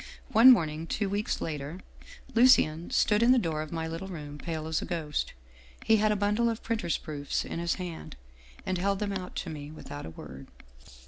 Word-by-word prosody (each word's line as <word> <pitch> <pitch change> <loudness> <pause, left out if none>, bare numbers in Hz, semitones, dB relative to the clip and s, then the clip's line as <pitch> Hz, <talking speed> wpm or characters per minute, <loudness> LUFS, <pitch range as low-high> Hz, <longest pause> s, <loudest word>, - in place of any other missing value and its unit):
One 230 +4 +8
morn 170 -11 +6
ing, 155 +2 -6
two 200 +2 -1
weeks 205 +4 -2
later, 150 +2 -4 0.5
Lucien 225 -10 +5
stood 210 0 +3
in 240 +2 +6
the - - +4
door 160 -8 0
of 155 - -7
my 165 -1 -3
little 165 +4 -5
room, 150 -5 -8
pale 160 -1 -4
as 160 0 -1
a - - -4
ghost. 160 -4 -3 0.5
He 220 - +5
had 215 0 +3
a - - +2
bundle 210 +3 +1
of 225 -1 -4
printer's 215 -7 -1
proofs 145 -2 -3
in - - -5
his 170 0 0
hand, 180 -3 -7 0.5
and 185 -1 -1
held 195 +2 +1
them 205 0 -2
out 185 -2 -5
to - - -4
me 145 -2 -7
without 145 - -8
a - - -6
word. 65 -4 -10
170 Hz, 205 wpm, -29 LUFS, 155-210 Hz, 0.5 s, One